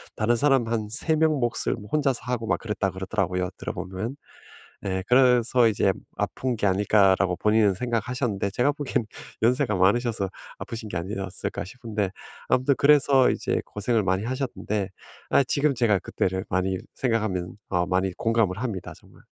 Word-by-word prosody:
다른 115 +2 +2
사람 135 -4 +3
한 110 -2 -1
3 155 +6 +1
명 160 0 +3
몫을 120 -1 0 0.2
혼자서 140 -5 +1
하고 125 -2 -3
막 - - +2
그랬다 105 -3 -2
그러더라고요 95 -1 -2
들어보면. 95 +8 -5 0.7
예. 95 0 -1
'그래서 125 -1 +5
이제 100 -2 +2 0.2
아픈 130 -2 -2
게 105 - -1
아닐까?'라고 95 -1 +3
본인은 105 -2 +3
생각하셨는데 120 -2 -1
제가 125 +7 +2
보긴 140 -6 -2 0.4
'연세가 125 -2 +2
많으셔서 100 +2 +2 0.3
아프신 115 -3 -6
게 - - -3
아니었을까?' 95 0 -4
싶은데 105 -2 -3 0.4
아무튼 130 +2 +3
그래서 140 -2 +5
이제 - - -1
고생을 110 +2 0
많이 95 +2 0
하셨는데 120 -6 -2 0.4
아 140 - +4
지금 140 +1 +1
제가 110 -5 +3
그때를 95 +4 -2
많이 95 0 0 0.2
생각하면 105 -7 -1
어 90 -2 +1
많이 95 0 +1
공감을 115 -5 +1
합니다 110 -8 -4
정말. - - -20
110 Hz, 355 characters per minute, -25 LUFS, 95-125 Hz, 0.7 s, 그래서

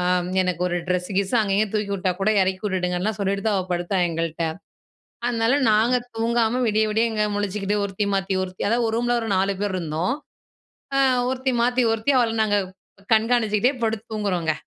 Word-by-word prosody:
ஆம். 180 0 +1
எனக்கு 180 -2 -2
ஒரு 175 - -1
ட்ரெஸ்ஸு 180 +1 -1
கிஸ்ஸு 200 +4 +1
அங்கே 200 -2 0
இங்கே 215 +1 +2
தூக்கி 210 -1 -1
விட்டா 185 -1 0
கூட 210 - +2
எறக்கி 185 0 -1
விட்டுடுங்கன்லாம் 185 +1 -1
சொல்லிட்டு 195 0 -1
தான் 205 -2 +2
அவள் 185 0 -5
படுத்தாள் 175 +1 0
எங்கள்ட்ட. 165 0 -2 0.8
அதனால 230 +1 +2 0.2
நாங்க 225 +4 +3 0.2
தூங்காம 230 +1 +1
விடிய 215 0 +2
விடிய 220 +2 +2
இங்க 215 -1 +1
முழிச்சிக்கிட்டு 205 0 -1
ஒருத்தி 200 +1 -2
மாத்தி 195 0 -1
ஒருத்தி, 185 0 -6
அதாவது 235 +2 +2
ஒரு 220 - -2
ரூம்ல 240 0 +1
ஒரு 225 - -4
நாலு 195 +1 +2
பேர் 205 -2 -1
இருந்தோம். 165 +4 -1 0.8
ஆ, - - +3 0.3
ஒருத்தி 260 0 -1
மாத்தி 250 +1 +2
ஒருத்தி 225 +5 0
அவள 235 -2 +2
நாங்க 205 -1 +2 0.6
கண்காணிச்சிக்கிட்டே 225 +1 +2
படுத்து 220 -1 -1
தூங்குறோங்க. 180 -7 0
205 Hz, 175 wpm, -23 LUFS, 185-225 Hz, 0.8 s, நாங்க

